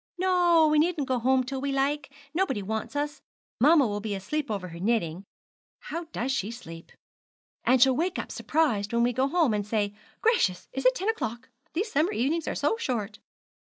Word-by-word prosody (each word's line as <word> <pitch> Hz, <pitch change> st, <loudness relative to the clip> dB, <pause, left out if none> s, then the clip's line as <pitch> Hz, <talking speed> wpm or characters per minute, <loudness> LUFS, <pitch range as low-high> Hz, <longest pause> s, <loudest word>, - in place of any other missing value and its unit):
'No, 350 Hz, -3 st, +4 dB
we 305 Hz, -, +4 dB
needn't 310 Hz, -3 st, +1 dB
go 255 Hz, -1 st, +1 dB
home 260 Hz, +2 st, +3 dB
till 260 Hz, +1 st, -4 dB
we 280 Hz, 0 st, -1 dB
like 275 Hz, +1 st, 0 dB, 0.2 s
nobody 340 Hz, -, 0 dB
wants 220 Hz, +6 st, -4 dB
us. 290 Hz, 0 st, -2 dB, 0.4 s
Mamma 295 Hz, +3 st, +6 dB
will 205 Hz, -2 st, -2 dB
be 210 Hz, -1 st, -3 dB
asleep 285 Hz, +10 st, -3 dB
over 195 Hz, -4 st, -3 dB
her 170 Hz, 0 st, -9 dB
knitting, 195 Hz, -3 st, -1 dB, 0.5 s
how 335 Hz, +3 st, -5 dB, 0.2 s
she 265 Hz, -7 st, -1 dB
does 230 Hz, +1 st, -6 dB
sleep! 165 Hz, -7 st, -11 dB, 0.7 s
and 255 Hz, +1 st, +4 dB
she'll 260 Hz, +1 st, +5 dB
wake 355 Hz, +6 st, -1 dB
up -, -, -5 dB
surprised 235 Hz, -10 st, 0 dB
when 235 Hz, 0 st, +3 dB
we 245 Hz, +1 st, +2 dB
go 260 Hz, +3 st, +1 dB
home, 315 Hz, -5 st, +2 dB
and 205 Hz, -1 st, 0 dB
say, 210 Hz, -2 st, 0 dB, 0.3 s
"Gracious, 440 Hz, -, +2 dB
is 270 Hz, 0 st, +2 dB
it 255 Hz, -, +4 dB
ten 385 Hz, -, -3 dB
o'clock? 255 Hz, -, -2 dB, 0.2 s
These 405 Hz, +7 st, -2 dB
summer 310 Hz, +7 st, +2 dB
evenings 305 Hz, +7 st, 0 dB
are -, -, -2 dB
so 295 Hz, +10 st, +1 dB
short!"' 220 Hz, -, -3 dB
265 Hz, 190 wpm, -27 LUFS, 220-315 Hz, 0.7 s, Mamma